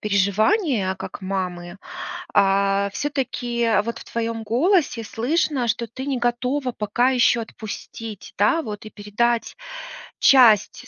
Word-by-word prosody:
переживания, 210 - +1
как - - -8
мамы. 185 -1 -4 0.6
А 195 0 +3
всё-таки 245 -4 -2
вот 235 +1 -5
в - - -10
твоём 230 -1 -2
голосе 255 - +1
слышно, 255 +3 0
что 235 0 -1
ты 260 +4 -7
не 275 -3 -1
готова 250 +2 -1
пока 235 +4 +1
ещё 245 -2 +3
отпустить, 220 -1 -8
да, 330 -1 +3
вот 210 -4 -7
и - - -7
передать 225 +3 -1 0.6
часть 245 -1 +5
230 Hz, 120 wpm, -22 LUFS, 205-255 Hz, 0.6 s, часть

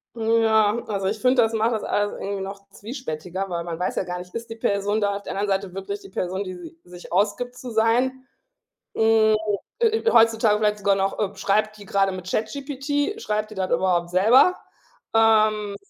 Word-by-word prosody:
Mhm, 230 0 +2
ja, 220 -1 +3
also, 195 -3 -2
ich 215 +2 -2
finde, 255 0 +4
das 225 0 +1
macht 225 +1 +1
das 220 - -2
alles 205 0 0
irgendwie 200 0 -4
noch 200 0 -8
zwiespältiger, 195 - -6
weil 170 -1 -3
man 170 0 -6
weiß 180 - -2
ja - - 0
gar 180 -1 -5
nicht, 180 0 -11
ist 230 0 -5
die 225 - -6
Person 205 0 0
da 200 -1 0
auf 200 - -6
der - - -6
anderen 205 +1 -1
Seite 185 -2 -10
wirklich 200 +1 -5
die - - -13
Person, 190 +1 -3
die 185 - -6
sie 175 -2 -11
sich 175 -1 -12
ausgibt 215 +6 0
zu 250 0 -8
sein. 245 +4 +1 0.7
Hm. 220 -1 +4 0.4
Äh, 470 - +4
äh, 450 +1 +1
heutzutage 225 -2 +4
vielleicht 210 -1 +1
sogar 200 0 +2
noch, 195 0 -1
äh, 205 -1 -1
schreibt 215 +2 0
die 205 - -12
grade 195 0 +1
mit 185 0 -7
ChatGPT? 285 - -2
Schreibt 215 0 -2
die 215 - -9
das 190 -1 -2
überhaupt 175 -2 +1
selber? 225 - +5 0.6
Ähm, 215 -2 +3
210 Hz, 205 wpm, -23 LUFS, 195-225 Hz, 0.7 s, selber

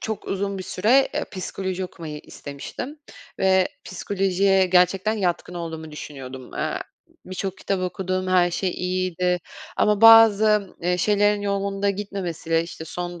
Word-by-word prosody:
çok 220 -1 -5
uzun 195 0 -2
bir 185 - -4
süre, 240 +10 +3
eee, - - -1
psikoloji 190 -1 -4
okumayı 155 -4 -8
istemiştim 150 - -8 0.4
ve 190 -1 +3 0.2
psikolojiye 195 0 +1
gerçekten 185 +3 +3
yatkın 180 -3 -2
olduğumu 160 -2 -6
düşünüyordum. 130 -4 -9
Eee, - - -2 0.5
birçok 185 +1 -4
kitap 195 -2 -2
okudum, 185 0 -2
her 180 -1 +4
şey 185 +2 -1
iyiydi 180 -1 -1 0.4
ama 210 -1 +2
bazı, 215 -3 +6
eee, 180 +1 +1
şeylerin 205 +2 +2
yolunda 200 0 0
gitmemesiyle, 180 -5 -2
işte, 170 -1 -8
son 175 +1 -6
185 Hz, 130 wpm, -23 LUFS, 175-200 Hz, 0.5 s, bazı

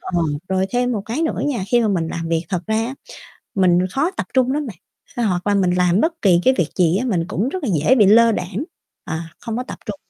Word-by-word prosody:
Ờ, 175 -2 -1 0.3
rồi 190 0 +1
thêm 245 0 0
một 210 -4 -2
cái 245 +9 -2
nữa 320 - -1
nha, 240 -10 -1
khi 240 -1 +3
mà 220 - +1
mình 170 -5 0
làm 165 0 -4
việc, 165 -1 0
thật 180 - -1
ra 220 0 0
á 260 - -5 0.6
mình 180 -3 +3
khó 285 - 0
tập 380 - -5
trung 260 -1 +3
lắm 295 +1 -2
bạn, 215 -7 -8 0.4
phải 240 - 0
hoặc 180 -2 -1
là 205 - +2
mình 190 -3 +2
làm 180 +1 +2
bất 330 +3 -1
kỳ 180 -4 +4
cái 260 - +5
việc 165 - +1
gì 175 0 +3
á 250 - -1
mình 180 -9 0
cũng 220 +7 -1
rất 370 +4 -5
là - - -1
dễ 255 - +4
bị 215 -6 +5
lơ 230 +3 +6
đãng, 190 +6 -3 0.4
à, 160 0 -4 0.2
không 225 -2 -4
có 250 - -2
tập - - -9
trung. 290 - -5
210 Hz, 270 wpm, -20 LUFS, 180-250 Hz, 0.6 s, lơ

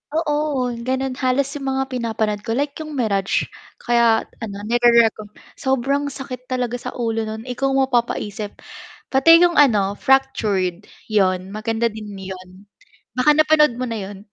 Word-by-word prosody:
Oo, 295 -5 0 0.2
gano'n 260 0 -1
halos 265 +2 +1
yung 270 - -5
mga 265 0 0
pinapanood 220 -4 -1
ko, 225 +2 -3
like 285 +2 0
yung 305 -2 -6
Mirage, 200 -6 0 0.4
kaya 235 -2 +3 0.2
ano, 220 -4 -6
nire-reco 235 -1 +3 0.3
sobrang 275 +1 0
sakit 255 -2 -8
talaga 245 -1 -2
sa - - -7
ulo 225 -2 -2
no'n. 220 +1 -6
Ikaw 255 +2 -2
ang 270 - +3
mapapaisip, 220 -5 -2 0.6
pati 275 +5 +7
'yong 345 -3 +3
ano 205 -8 +3
Fractured, 210 -9 +1 0.2
'yon, 185 -2 +1
maganda 225 +2 -1
din 215 0 -8
'yon, 185 -1 -8 0.7
baka 255 +4 +3
napanood 305 -3 +4
mo 255 - -2
na 230 - -4
'yon. 195 0 -8
240 Hz, 145 wpm, -21 LUFS, 215-270 Hz, 0.7 s, pati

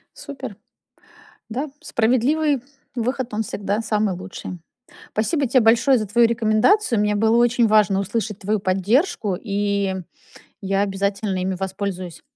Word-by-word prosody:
Супер. 265 -7 -8 0.9
Да, 270 +6 -3
справедливый 255 +5 +1 0.3
выход, 250 0 -2
он 220 - 0
всегда 205 +1 -2
самый 210 -3 0
лучший. 185 -1 -8 0.5
Спасибо 275 +6 0
те 255 +2 +4
большое 235 +4 +4
за 215 -2 -3
твою 235 +3 +4
рекомендацию. 230 - +2
Мне 210 0 +1
было 220 +2 +3
очень 240 -1 +3
важно 210 -2 +4
услышать 210 +1 -3
твою 210 +2 -1
поддержку, 200 - +1
и 200 -2 -1 0.7
я 195 0 0
обязательно 200 0 -1
ими 190 +1 -1
воспользуюсь. 190 -2 -5
215 Hz, 125 wpm, -22 LUFS, 195-240 Hz, 0.9 s, те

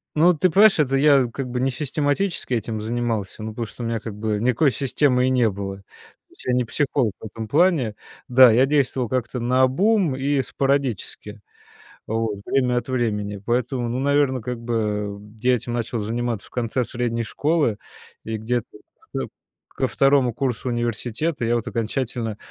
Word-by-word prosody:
Ну, 170 +4 +5
ты 175 +3 +2
понимаешь, 200 +2 +5
это 135 -3 +2
я 140 -2 +5
как 135 +2 -4
бы 125 0 -2
не 130 +1 +1
систематически 145 +3 -1
этим 110 -1 -2
занимался, 115 -2 -3
ну, 110 - -4
потому 115 +1 -4
что 120 - -8
у - - -3
меня 115 -1 -1
как 110 -1 -7
бы 105 0 -1
никакой 125 +4 +3
системы 130 +1 +1
и - - +3
не 125 -3 +3
было. 95 -1 -5
То 100 - -18 0.5
есть - - -17
я 125 - +1
не 125 -1 +2
психолог 130 -3 0
в - - -10
этом 110 +1 -6
плане. 145 - +2 0.3
Да, 125 -1 +7
я 125 +4 +5
действовал 135 -4 +1
как-то 125 0 -2
наобум 130 - +2
и 135 +1 +1
спорадически 130 -7 -2 0.7
вот 110 -2 -1
время 125 -2 +1
от 120 - -3
времени. 105 -5 -1
Поэтому, 120 +1 0
ну, 125 +2 -2
наверно, 140 -2 +2
как 125 +1 -4
бы 105 -3 -2 0.2
я 125 +2 +3
этим 120 +1 -5
начал 120 0 -2
заниматься 115 0 -3
в - - -20
конце 125 +1 -1
средней 120 -1 -2
школы. 145 -3 0 0.5
И 110 0 -3
где-то 115 +2 -2 0.5
ко - - -2 0.5
ко - - 0
2 135 -3 +3
курсу 125 0 -2
университета 120 +5 -2
я 120 +1 +2
вот 115 - -2
окончательно 115 -1 -2
125 Hz, 175 wpm, -23 LUFS, 115-135 Hz, 0.7 s, Да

